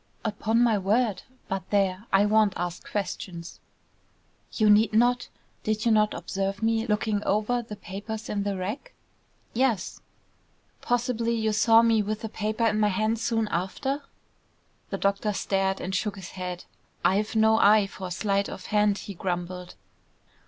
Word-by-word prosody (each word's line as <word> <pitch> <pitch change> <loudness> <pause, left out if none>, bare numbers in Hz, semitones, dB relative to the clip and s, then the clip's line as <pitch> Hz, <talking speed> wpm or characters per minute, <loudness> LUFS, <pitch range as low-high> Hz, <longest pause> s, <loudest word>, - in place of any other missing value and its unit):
"Upon 220 +2 +1
my 225 -4 +3
word! 210 +2 +1 0.3
But 190 -1 -4
there, 195 +1 +1
I 195 +1 +5
won't 210 -2 +3
ask 175 0 -5
questions." 180 -3 -5 0.9
"You 215 - +2
need 210 +1 +5
not. 245 +2 +3 0.3
Did 215 +1 -1
you 230 - +4
not 215 -1 +3
observe 195 +2 -3
me 225 +1 +1
looking 210 -1 0
over 215 +4 +1
the 220 -2 -8
papers 210 +3 -7
in 205 - -2
the 200 -1 -2
rack?" 210 - -5 0.6
"Yes." 235 -6 0 0.8
"Possibly 235 -1 0
you 220 -1 0
saw 225 +1 +5
me 225 -2 +4
with 215 +2 -3
a 225 - -3
paper 215 +2 -1
in 215 -1 +2
my 210 - +4
hand 215 +3 0
soon 225 -1 0
after?" 265 - -2 0.9
The - - -3
doctor 200 +1 0
stared 195 -1 0
and 190 - -4
shook 205 +2 -1
his 190 -2 -9
head. 180 -1 -6 0.4
"I've 210 +4 +2
no 220 0 +4
eye 210 -1 +6
for 195 -1 -7
sleight 200 +2 0
of 185 - -8
hand," 210 -1 +3
he 200 - -7
grumbled. 180 0 -4
210 Hz, 155 wpm, -26 LUFS, 195-225 Hz, 0.9 s, eye